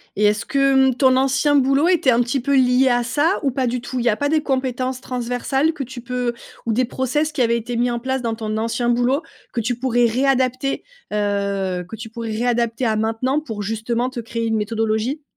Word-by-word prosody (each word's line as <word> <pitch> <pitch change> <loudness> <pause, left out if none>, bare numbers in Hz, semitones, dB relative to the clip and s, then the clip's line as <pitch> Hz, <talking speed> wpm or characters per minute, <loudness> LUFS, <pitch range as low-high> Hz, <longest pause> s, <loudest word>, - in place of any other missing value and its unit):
Et 210 - +2
est-ce 210 +1 +2
que, 275 -1 +3
mmh, - - -5
ton 260 0 +4
ancien 270 +2 +2
boulot 275 +4 +3
était 325 -8 +3
un 235 - +3
petit 245 +3 0
peu 275 +3 +1
lié 255 0 +4
à 245 -1 +2
ça 295 +9 +1
ou 280 - +1
pas 260 0 -1
du 245 0 -1
tout? 255 +1 -5
Il 240 - -2
y - - +5
a 210 - +2
pas 285 +5 -1
des 310 -1 +2
compétences 260 -1 -1
transversales 255 +5 -1
que 290 - -4
tu 260 -1 -8
peux 250 -1 -2 0.3
ou 225 - +2
des 250 +2 +2
process 265 +5 -1
qui 280 - -2
avaient 235 0 +3
été 235 +1 -4
mis 245 +1 +2
en 240 0 -2
place 265 +1 -2
dans 230 -2 -2
ton 215 -1 -4
ancien 230 +2 -1
boulot 245 +6 +2 0.3
que 240 - -1
tu 240 +3 -1
pourrais 245 -1 +2
réadapter? 260 +2 +1 0.3
Heu, 200 -3 -1
que 225 - -6
tu 225 +1 -8
pourrais 230 0 -6
réadapter 235 +1 0
à 220 - +1
maintenant 225 +6 0
pour 220 -9 -6
justement 225 +4 -1
te 250 - -5
créer 230 0 -3
une 225 -1 0
méthodologie? 225 +6 -1
245 Hz, 225 wpm, -21 LUFS, 230-265 Hz, 0.3 s, y